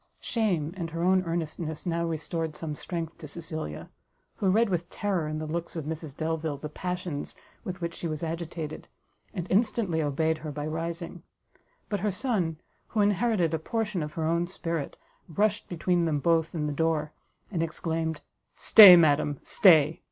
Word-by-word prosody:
Shame, 180 -9 0
and 170 -3 -4
her 165 +1 -3
own 185 +1 +4
earnestness, 160 -1 -3
how 170 -1 0
restored 160 0 -3
some 155 -1 -5
strength 165 +1 -5
to 155 - -8
Cecilia, 155 - -6 0.5
who 195 - +1
read 225 +5 +4
with 175 -2 -2
terror 190 -7 -1
in 155 0 -3
the 155 - -4
looks 170 +3 -4
of 160 -3 -4
Mrs 155 -2 -6
Delvile 160 -2 -2
the 150 +2 -6
passions 180 -2 -4 0.3
with 185 0 -6
which 170 0 -3
she 170 - -4
was 155 0 -4
agitated, 165 -1 -5 0.4
and 180 -5 -4
instantly 200 -5 +2
obeyed 160 +2 0
her 155 -1 -6
by 145 0 -4
rising; 165 +2 -4 0.7
but 205 - -2
her 210 +3 0
son, 185 - -1 0.3
who 215 - 0
inherited 205 -4 +2
a 160 - 0
portion 210 +1 -2
of 150 0 -5
her 160 - -3
own 170 +2 +1
spirit, 165 -4 -4 0.3
rushed 205 +6 0
between 175 0 +1
them 155 -3 +1
both 165 +1 +2
and 150 -2 -1
the 150 - -2
door, 155 0 0 0.4
and 175 -5 -1
exclaimed, 160 -1 -2 0.3
"Stay, 205 -5 +10
madam, 150 -3 +3
stay! 160 -5 +5
165 Hz, 170 wpm, -28 LUFS, 155-180 Hz, 0.7 s, Stay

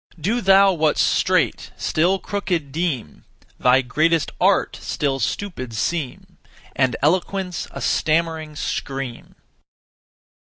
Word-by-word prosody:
Do 220 +10 0
thou 195 0 +6
what's 155 -3 +1
straight - - +1
still 175 +5 +1
crooked 180 -8 -3
deem; 150 - -3 0.4
Thy 130 +1 +4
greatest 155 +3 +1
art - - +2
still 135 -2 -1
stupid 130 - -3
seem, 140 +3 -3 0.4
And 130 -3 +2
eloquence 180 +3 0
a - - -8
stammering 160 -1 0
scream. 135 -4 -5
155 Hz, 105 wpm, -21 LUFS, 135-180 Hz, 0.4 s, thou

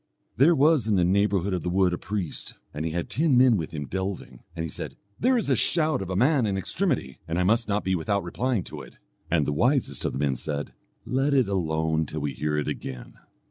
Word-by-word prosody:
There 160 +6 +5
was 145 -4 +3
in 105 - +2
the 90 - +3
neighbourhood 100 0 +2
of 90 - -1
the 90 - -2
wood 90 0 +2
a - - -1
priest, 95 -5 -3 0.2
and 75 +2 -4
he 80 - -2
had 85 +1 -2
ten 140 +2 +2
men 125 -2 +6
with 80 -6 -2
him 75 -3 -5
delving, 95 -7 -5 0.2
and 80 - -3
he - - -2
said, 75 - -7 0.2
'There 255 +2 +3
is 215 -11 0
a - - +5
shout 155 - +2
of 95 - -5
a 95 - -2
man 130 - +3
in 100 -1 -1
extremity 125 - -1
and 80 +1 -2
I 90 - +2
must 115 +5 +2
not 105 0 0
be 95 - 0
without 95 +4 0
replying 105 +5 -1
to - - -8
it.' - - -14 0.3
And 80 -4 +2
the 75 - -1
wisest 125 - +1
of - - -1
the - - -3
men 70 -1 0
said, 70 +3 -4 0.3
'Let 135 +2 +1
it 130 -5 +3
alone 80 -4 0
till 75 +1 -5
we 70 -1 -2
hear 75 +4 -2
it 75 - -1
again.' 65 -2 -6
95 Hz, 240 wpm, -26 LUFS, 80-125 Hz, 0.3 s, men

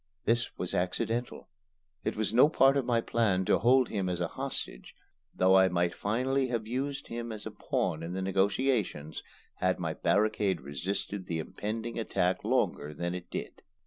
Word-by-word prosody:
This 120 +1 +1
was 90 - -3
accidental. 115 +7 -2 0.6
It - - -1
was 110 0 -1
no 125 +5 +7
part 135 -3 +5
of 140 -3 +1
my 120 -2 +2
plan 100 -6 +1
to - - +3
hold 125 +3 +4
him 95 -4 -1
as 90 -1 -2
a 85 -1 -1
hostage, - - -5 0.4
though 95 +1 +4
I 95 0 +6
might 85 -1 +1
finally 130 +6 0
have 115 -3 -2
used 135 +4 -3
him 120 0 -4
as 110 -1 -6
a - - -5
pawn 80 - -1
in 85 +2 -5
the 95 - -2
negotiations, 95 - 0 0.4
had 90 0 +1
my 80 -2 -2
barricade 105 +1 +1
resisted 90 +7 -4
the 85 - -2
impending 110 +8 -4
attack 90 -4 0
longer 75 +1 0
than 85 +3 -2
it 90 -1 -7
did. - - -6
100 Hz, 175 wpm, -30 LUFS, 90-120 Hz, 0.6 s, no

